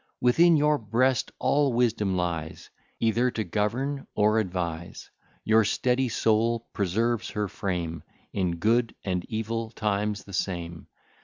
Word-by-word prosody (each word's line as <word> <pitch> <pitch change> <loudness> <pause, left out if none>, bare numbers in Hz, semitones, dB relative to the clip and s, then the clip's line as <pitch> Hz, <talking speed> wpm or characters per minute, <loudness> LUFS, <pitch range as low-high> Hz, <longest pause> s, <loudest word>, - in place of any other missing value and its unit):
Within 165 +7 +5
your 150 0 +3
breast 115 +2 +1
all 140 -3 +2
wisdom 110 -5 +1
lies, 85 -3 -3 0.3
Either 115 +3 +2
to 110 -3 -2
govern 120 +9 -2
or 105 +1 +3
advise; 85 -4 -4 0.3
Your 110 +1 +4
steady 125 +4 +1
soul 115 +1 +1
preserves 110 +4 0
her 105 -1 -2
frame, 85 -5 -3 0.3
In 90 -3 0
good 115 +6 +1
and 90 -2 -1
evil 115 +1 -3
times, 105 -2 -1
the 100 - -12
same. 85 -3 -3
110 Hz, 130 wpm, -27 LUFS, 95-120 Hz, 0.3 s, Within